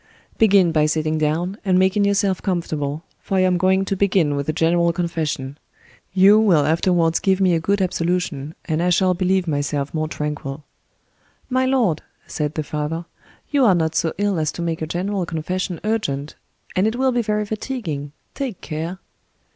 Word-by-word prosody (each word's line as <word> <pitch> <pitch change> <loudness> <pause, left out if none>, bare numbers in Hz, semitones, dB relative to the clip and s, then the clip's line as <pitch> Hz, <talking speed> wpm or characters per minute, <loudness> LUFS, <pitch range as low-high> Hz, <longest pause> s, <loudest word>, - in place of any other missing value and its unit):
"Begin 200 -5 +5
by 155 -1 +3
sitting 155 0 0
down, 170 +6 -1
and 185 -2 +2
making 190 +2 +3
yourself 200 -2 +1
comfortable, 155 -5 -2 0.2
for 195 - -2
I - - +4
am 185 -1 +2
going 190 +2 +3
to 195 - -1
begin 185 -6 +2
with 140 +1 -3
a - - +4
general 170 +2 +2
confession; 155 -5 -3 0.5
you 195 +3 +6
will 175 -10 +4
afterwards 165 +1 +2
give 190 -1 +1
me 185 -2 +3
a 165 - +2
good 200 +4 +1
absolution, 170 -4 -2
and 160 -1 -1
I 180 - +2
shall 185 +1 +3
believe 185 0 +1
myself 145 -1 -1
more 155 -1 -1
tranquil." 150 -2 -5 0.9
"My 260 +1 +2
lord," 235 - +1 0.2
said 150 0 -3
the 155 - -1
father, 155 +3 -3 0.5
"you 285 -2 +3
are 200 -6 +5
not 160 -2 0
so 160 0 +1
ill 200 -3 0
as 155 -1 0
to 170 - -4
make 165 -1 -2
a 160 - -2
general 190 +4 -2
confession 175 +2 -3
urgent—and 185 -1 -3
it 220 - -1
will 260 +1 +2
be 245 -1 +1
very 210 -1 -1
fatiguing—take 210 - -5
care." 160 +4 -5
175 Hz, 170 wpm, -21 LUFS, 155-195 Hz, 0.9 s, you